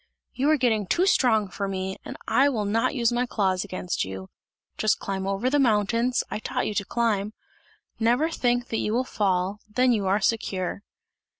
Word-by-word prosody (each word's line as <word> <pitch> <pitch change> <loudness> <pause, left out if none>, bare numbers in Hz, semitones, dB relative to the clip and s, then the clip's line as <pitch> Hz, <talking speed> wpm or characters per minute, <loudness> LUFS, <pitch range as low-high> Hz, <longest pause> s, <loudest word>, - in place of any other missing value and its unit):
"You 275 +3 +1
are 310 - +4
getting 220 -6 +1
too 350 - +2
strong 225 - +3
for 195 +2 -4
me, 190 0 -3
and - - -8
I 280 +2 +4
will 220 -6 -1
not 225 +7 +1
use 235 -3 +2
my 245 +1 0
claws 190 -5 0
against 185 -3 -3
you! 95 0 -7 0.4
Just 215 0 +2
climb 195 -1 -4
over 195 +5 -1
the 290 +3 +2
mountains, 230 0 +2
I - - -2
taught - - -2
you - - -2
to 205 -1 -1
climb! 215 -3 0 0.7
Never 245 +8 +2
think 245 -4 0
that 225 - -1
you 210 - -1
will 250 +2 +2
fall, 195 -4 -1
then 250 +4 +3
you 205 -5 +1
are 195 +2 +2
secure!" 200 -5 -1
215 Hz, 190 wpm, -25 LUFS, 195-245 Hz, 0.7 s, are